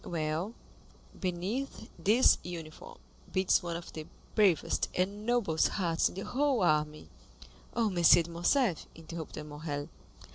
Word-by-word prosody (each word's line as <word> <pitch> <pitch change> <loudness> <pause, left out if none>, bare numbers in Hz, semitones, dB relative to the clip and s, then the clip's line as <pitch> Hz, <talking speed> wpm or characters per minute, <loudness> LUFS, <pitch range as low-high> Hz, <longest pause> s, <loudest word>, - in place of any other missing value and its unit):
"Well, 165 +6 -2 0.6
beneath 190 +9 -3
this 225 +6 +5
uniform 165 -3 -8 0.3
beats 190 0 +3
one 170 -1 -4
of 170 0 -8
the 155 -1 -7 0.3
bravest 200 -7 +2
and 200 +4 -1
noblest 230 -10 +2
hearts 170 -4 +1
in - - -12
the 195 - -5
whole 270 -4 +1
army." 150 - +1 0.7
"Oh, 235 -1 +2
M. 180 -3 -2
de 170 0 +7
Morcerf," 175 - +1
interrupted 160 -1 -7
Morrel. 145 -1 -5
175 Hz, 130 wpm, -31 LUFS, 160-205 Hz, 0.7 s, de